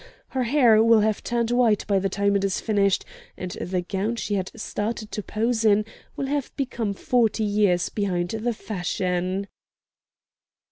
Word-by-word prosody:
Her 260 -2 -1
hair 235 -4 +5
will 230 -1 +5
have 215 0 +1
turned 235 -1 -1
white 240 -4 +3
by 200 -2 +2
the 195 +1 -1
time 200 +1 +1
it 200 - +1
is 195 -1 0
finished, 200 -3 +1 0.3
and 180 -1 -5
the 180 +1 -2
gown 195 +5 -2
she 205 -3 -1
started 215 0 -4
to 210 - -3
pose 225 +3 -1
in 210 -1 +4 0.3
will 275 - -2
have 280 0 -2
become 235 -6 -2
forty 225 0 +1
years 205 -4 +2
behind 180 -4 -1
the 225 +3 -1
fashion!" 185 -1 -2
210 Hz, 155 wpm, -24 LUFS, 195-230 Hz, 0.3 s, hair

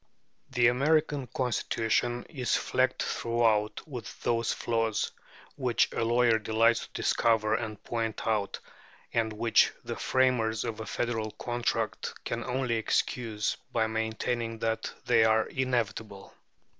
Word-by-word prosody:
The 125 -2 +2
American 140 +2 +2
Constitution 120 -1 0
is 130 -6 -1
flecked 130 0 +1
throughout 115 0 0
with 125 -7 -8
those 115 -1 +1
flaws 115 -2 0 0.5
which 125 -3 +2
a - - 0
lawyer 115 -1 +3
delights 110 +2 +2
to - - -33
discover 110 -2 +2
and 110 -2 -3
point 115 -2 -3
out, 105 -3 0 0.6
and 115 -1 +1
which 110 +1 +3
the - - -4
framers 120 -4 +1
of 110 -1 -4
a 110 - -6
federal 115 -2 -2
contract 120 +2 -2
can 115 0 -2
only 125 -2 -1
excuse 110 -1 -1
by 115 -2 +2
maintaining 110 +1 -2
that 110 0 -2
they 120 -2 +5
are 110 0 +4
inevitable. 110 -6 -2
115 Hz, 125 wpm, -29 LUFS, 110-120 Hz, 0.6 s, they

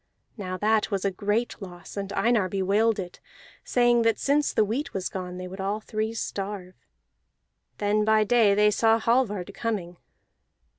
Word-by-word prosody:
Now 185 -4 -5
that 215 +2 +2
was 200 -2 -2
a 195 - +2
great 210 +5 -2
loss, 180 -2 -10
and 200 -1 -4
Einar 220 -4 +2
bewailed 200 +4 +1
it, 180 -3 -6 0.4
saying 240 -1 +3
that 225 -1 +2
since 290 +1 +1
the 215 - +2
wheat 245 +7 -3
was 190 -1 -2
gone 180 -1 -6
they 185 0 -6
would 190 +1 -7
all 200 +2 -1
three 220 +1 -3
starve. 195 -4 -5 1.0
Then 210 +1 +1
by 215 0 +4
day 215 -2 +4
they 210 +1 +4
saw 225 +2 +3
Hallvard 215 -5 0
coming. 195 -6 -3
210 Hz, 160 wpm, -26 LUFS, 195-225 Hz, 1.0 s, by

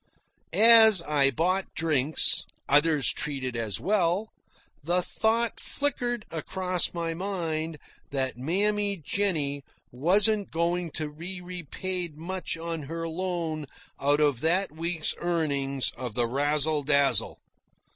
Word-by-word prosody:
As 220 -4 +7
I 145 -3 +3
bought 180 +8 -1
drinks 155 -2 +1 0.2
others 145 -1 +4
treated 135 -4 -3
as 115 -3 -2
well 200 +1 +1 0.5
the 175 +4 0
thought 225 +4 0
flickered 245 -5 0
across 180 +3 0
my 165 -1 -3
mind 165 -4 -3 0.3
that 135 -2 -2
Mammy 200 - 0
Jennie 155 -5 -1 0.3
wasn't 200 - +3
going 170 +1 -1
to 150 -1 -4
be 180 +4 -6
repaid 180 -1 -5
much 180 +1 -4
on 165 -1 -4
her 165 0 -4
loan 165 -3 -3 0.3
out 145 +1 +2
of 145 -5 +2
that 180 +3 +1
week's 165 0 -1
earnings 140 -6 -1
of 120 -4 -6
the 120 - +2
Razzle 145 +4 0
Dazzle. 140 -1 +2
165 Hz, 115 wpm, -27 LUFS, 145-185 Hz, 0.5 s, As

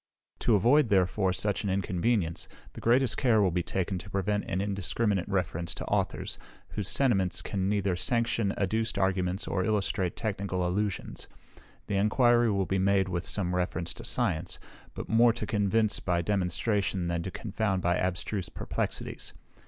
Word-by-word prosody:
To 115 - +3
avoid 120 +6 +4
therefore 95 0 +2
such 100 +4 -1
an 100 - -1
inconvenience, 95 -1 0 0.3
the - - -9
greatest 120 +1 +3
care 120 -5 +3
will 95 -3 +3
be 90 +1 0
taken 95 +1 -2
to 90 - -10
prevent 100 +1 -1
an 90 - -2
indiscriminate 100 0 -1
reference 85 -3 -1
to - - -5
authors, - - -1 0.3
whose - - -3
sentiments 95 -10 +1
can 95 -1 -1
neither 100 -3 +1
sanction 115 +1 0
adduced 110 +3 0
arguments 95 -1 0
or 95 - 0
illustrate 95 -3 0
technical 100 -4 -2
allusions. 100 +2 -2 0.6
The 100 - -1
enquiry 120 +3 +4
will 100 -2 +1
be 95 0 0
made 95 0 +2
with 85 0 -2
some 90 -3 -1
reference 90 -1 -1
to - - -9
science, - - 0 0.4
but - - -6
more 115 +1 +5
to - - -4
convince 105 +1 +1
by 85 -2 0
demonstration 95 0 0
than 85 0 -1
to 95 - -4
confound 100 -1 -2
by 85 +1 +2
abstruse 95 +1 -2
perplexities. - - -4
100 Hz, 160 wpm, -29 LUFS, 90-110 Hz, 0.6 s, more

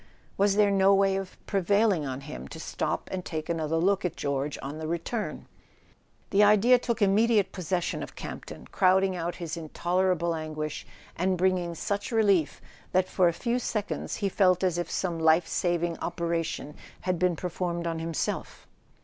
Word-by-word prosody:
Was 200 0 +3
there 205 -1 +4
no 195 0 +5
way 195 0 +3
of 195 -1 -5
prevailing 200 -4 +2
on 130 0 -4
him 150 +2 -8
to 160 - -9
stop - - -3
and 185 -1 -3
take 155 -2 -5
another 165 -1 -1
look 195 +4 +2
at 180 - -2
George 140 0 -2
on 145 +3 -5
the 160 - -4
return? 170 +7 -3 0.9
The 205 +1 +5
idea 215 +4 +6
took 235 -3 -1
immediate 205 +1 +3
pos¬ 185 -3 -7
session 175 0 -1
of - - -8
Campton, - - -8
crowding 190 0 +3
out 175 0 -3
his 165 -3 -5
intolerable 175 +1 0
an¬ 155 -1 -4
guish, 155 0 -4 0.3
and 185 +1 +1
bringing 180 -2 +1
such 200 +7 -3
relief 200 -8 +2 0.3
that 185 0 +3
for 180 -2 +3
a - - +4
few 235 +8 -1
seconds 215 -4 -3
he 200 - -1
felt 185 -1 +3
as 175 -2 +1
if 175 - -3
some 175 -3 -2
life 160 +1 +4
saving 175 0 -1
operation 165 -3 -3 0.3
had 180 -2 -1
been 180 -1 +2
per¬ 180 +2 -4
formed 170 -1 -2
on 165 -1 -2
himself. 165 -1 -3
180 Hz, 175 wpm, -28 LUFS, 165-195 Hz, 0.9 s, idea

